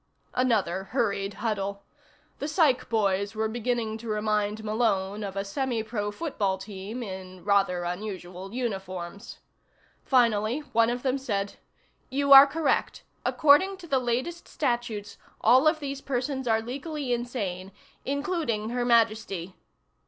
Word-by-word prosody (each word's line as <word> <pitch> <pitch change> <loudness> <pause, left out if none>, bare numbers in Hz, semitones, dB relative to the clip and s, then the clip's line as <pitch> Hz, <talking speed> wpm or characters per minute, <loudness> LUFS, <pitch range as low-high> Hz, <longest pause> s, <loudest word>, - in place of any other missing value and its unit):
Another 200 -7 +1
hurried 200 -4 -1
huddle. 200 -2 -2 0.6
The 290 - -2
psych 300 -6 +2
boys 200 -2 +1
were 220 0 0
beginning 225 -1 -2
to 230 - -9
remind 210 0 0
Malone 210 -2 0
of 195 -1 -5
a 195 0 -2
semi 235 +2 -1
pro 215 -2 -3
football 205 - -1
team 200 +4 -6
in 185 -3 -8
rather 195 -3 +2
unusual 185 0 -5
uniforms. 195 -4 -5 0.7
Finally 235 0 +2
one 230 0 +4
of 245 +1 -3
them 265 0 +1
said: 200 -6 -2 0.5
"You 280 +1 +4
are 275 +1 +11
correct. 310 +2 0 0.2
According 320 +6 +4
to 370 - -11
the 275 -5 +1
latest 255 +8 -2
statutes, 240 -7 -2 0.2
all 255 +6 +5
of 310 0 +3
these 275 -2 -5
persons 265 0 -2
are 225 -1 +2
legally 275 +2 -3
insane 205 -7 -3 0.3
including 280 - -1
Her 245 0 0
Majesty." 215 -6 +1
225 Hz, 130 wpm, -27 LUFS, 200-260 Hz, 0.7 s, are